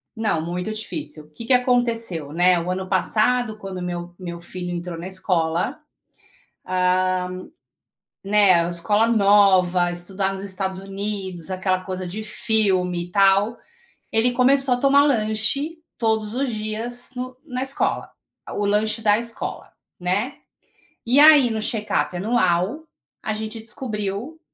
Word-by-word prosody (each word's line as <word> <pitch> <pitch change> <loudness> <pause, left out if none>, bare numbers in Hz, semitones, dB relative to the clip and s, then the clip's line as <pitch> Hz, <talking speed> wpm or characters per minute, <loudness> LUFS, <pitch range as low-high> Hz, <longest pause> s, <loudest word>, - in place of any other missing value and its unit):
Não, 215 -8 0
muito 180 +5 -4
difícil. 215 - -5
O. - - -23
Que 230 +9 -9
que 255 - +3
aconteceu, 230 - +1
né? 175 +1 +4
O 170 - -4
ano 185 0 -3
passado, 220 +4 +2
quando 190 -3 -7
meu 175 0 -5
meu 170 -2 -6
filho 175 0 -6
entrou 175 0 -5
na 170 +2 -6
escola, 180 - 0 0.9
hã, 185 0 +1 1.0
né, 200 -1 +5
a - - -2
escola 205 +6 +2
nova, 195 -5 +4
estudar 190 +3 -2
nos 195 0 -6
Estados 190 -1 -2
Unidos, 195 -3 -5
aquela 185 0 0
coisa 185 -1 -5
de 215 +5 -6
filme, 190 -5 0
e 175 - -16
tal, 200 +3 +3 0.5
ele 235 +3 +2
começou 265 +1 +3
a - - 0
tomar 280 +2 +5
lanche 255 +5 0 0.2
todos 220 -2 0
os 270 +1 -1
dias 225 +2 -2
no 255 0 -6
na 255 -4 -4
escola, 270 +1 -1 0.4
a - - -7
o 205 - -1
lanche 215 +2 0
da 210 0 +4
escola, 235 -1 -5 0.3
né, 205 +10 -1 0.7
e 250 +4 +4
aí, 295 -4 +8
no 220 - -2
check-up 215 -4 -1
anual, 210 - 0 0.3
a 215 - -2
gente 220 +1 -4
descobriu 225 +3 -4
205 Hz, 140 wpm, -22 LUFS, 185-230 Hz, 1.0 s, aí